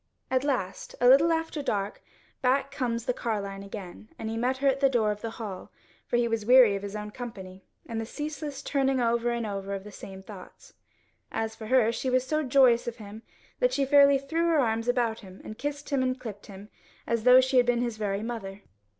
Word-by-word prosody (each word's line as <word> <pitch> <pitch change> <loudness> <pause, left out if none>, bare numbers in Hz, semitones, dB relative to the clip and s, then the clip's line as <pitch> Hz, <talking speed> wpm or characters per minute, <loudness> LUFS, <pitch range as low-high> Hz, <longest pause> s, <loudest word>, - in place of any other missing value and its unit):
At 260 0 +2
last, 250 -10 -3
a 245 - +4
little 285 +6 +6
after 325 -2 -1
dark, 205 -6 -2 0.4
back 270 +2 +1
comes 240 -5 -2
the 250 - 0
carline 200 -5 -3
again, 200 +1 -9
and 220 - -4
he - - -3
met 250 +3 0
her 275 +1 0
at 270 0 +2
the 275 -1 +4
door 225 -5 +2
of 210 0 -6
the 230 - -3
hall, 200 -5 -7 0.4
for 240 - +1
he 240 0 +2
was 225 -2 -1
weary 245 -2 +6
of 195 - -4
his 200 +1 -6
own 210 0 -5
company, 190 -6 -9 0.2
and 230 -6 -4
the - - -4
ceaseless 295 0 -5
turning 270 -2 +1
over 235 0 +1
and 235 -1 -2
over 200 -1 -4
of 195 - -6
the 210 - -10
same 190 -1 -10
thoughts. 190 -2 -13 0.6
As 225 0 -3
for 220 - -9
her, 240 -2 +4
she 260 +3 -2
was 255 0 +2
so 305 +3 0
joyous 255 -4 +4
of 235 - -3
him 210 0 -10 0.4
that - - +2
she 275 - +1
fairly 280 0 +6
threw 325 +5 -1
her 325 -3 +3
arms 230 -2 0
about 240 -2 +1
him 190 -2 -13
and 215 - -9
kissed 290 0 -5
and 260 -2 0
clipped 210 -5 -8
him, 200 +1 -11 0.4
as 230 -2 -1
though 250 +1 +8
she 260 0 +2
had 245 -1 +5
been 240 -1 +2
his 235 -3 -2
very 205 -1 -2
mother. 205 -4 -6
235 Hz, 220 wpm, -27 LUFS, 210-265 Hz, 0.6 s, though